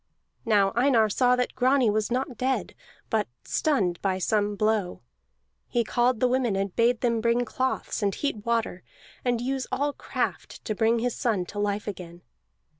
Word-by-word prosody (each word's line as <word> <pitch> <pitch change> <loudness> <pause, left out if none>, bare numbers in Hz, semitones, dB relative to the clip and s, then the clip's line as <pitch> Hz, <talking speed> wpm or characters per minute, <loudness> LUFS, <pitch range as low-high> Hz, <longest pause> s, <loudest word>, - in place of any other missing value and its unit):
Now 205 -3 +3
Einar 240 -3 +4
saw 250 +4 +3
that 250 0 -1
Grani 255 0 +3
was 215 0 0
not 255 0 -1
dead, 260 +2 -1 0.4
but 220 -1 +1 0.2
stunned 195 - 0
by 190 -2 0
some 205 +2 0
blow. 215 -3 0 0.6
He 240 -1 +1
called 240 +1 +1
the 255 - +3
women 250 -4 +1
and 195 -1 -2
bade 235 0 +2
them 235 -2 +1
bring 235 +1 +2
cloths, 260 0 -2
and 200 -1 0
heat 255 -8 -3
water, 230 -6 -1 0.4
and 245 -2 +1
use 260 +2 -2
all 285 +2 0
craft - - -4
to 215 - -1
bring 225 +3 +2
his 240 +1 -1
son 210 -7 0
to 205 +4 -7
life 205 +1 -1
again. 175 -4 -7
230 Hz, 170 wpm, -26 LUFS, 205-250 Hz, 0.6 s, Einar